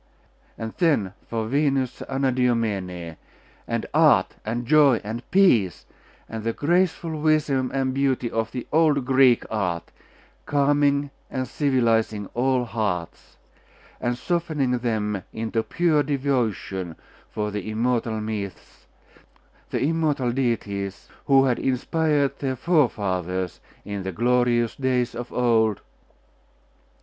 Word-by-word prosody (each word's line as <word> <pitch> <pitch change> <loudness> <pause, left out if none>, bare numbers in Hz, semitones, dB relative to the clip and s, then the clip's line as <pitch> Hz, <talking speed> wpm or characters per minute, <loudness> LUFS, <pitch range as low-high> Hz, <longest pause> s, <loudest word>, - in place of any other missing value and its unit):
And 110 0 -5
then 140 - +2
for 115 -1 -2
Venus 135 -1 0
Anadyomene, 115 - -1 0.5
and - - -2
art, - - +4
and 120 +2 -3
joy, 145 -4 +5
and 110 +3 -5
peace, 120 - +3 0.4
and 110 -1 -6
the 115 0 -1
graceful 165 0 0
wisdom 150 -4 +2
and 135 -1 0
beauty 135 -2 +1
of 115 0 -1
the 125 -2 -5
old 150 -4 +3
Greek 130 -2 +4
art, 90 -6 -2 0.6
calming 145 0 +2 0.2
and 130 0 -3
civilising 115 -6 +1
all 125 0 +1
hearts, 100 -7 -4 0.6
and 120 0 -1
softening 150 -6 -1
them 105 -4 -1
into 115 0 -1
pure 160 +4 +1
devotion 125 - -1 0.3
for 105 0 -3
the 105 0 -4
immortal 115 0 0
myths, 105 -3 -6 0.8
the - - -1
immortal 150 -5 +1
deities, 105 -6 -2 0.2
who 135 -1 +5
had 125 -2 +1
inspired 145 +2 0
their 135 -2 -1
forefathers 95 - 0 0.3
in 100 -1 -4
the 95 0 -4
glorious 120 +2 +2
days 130 -2 0
of 120 +1 -6
old.... 110 -4 +2
125 Hz, 115 wpm, -24 LUFS, 110-140 Hz, 0.8 s, joy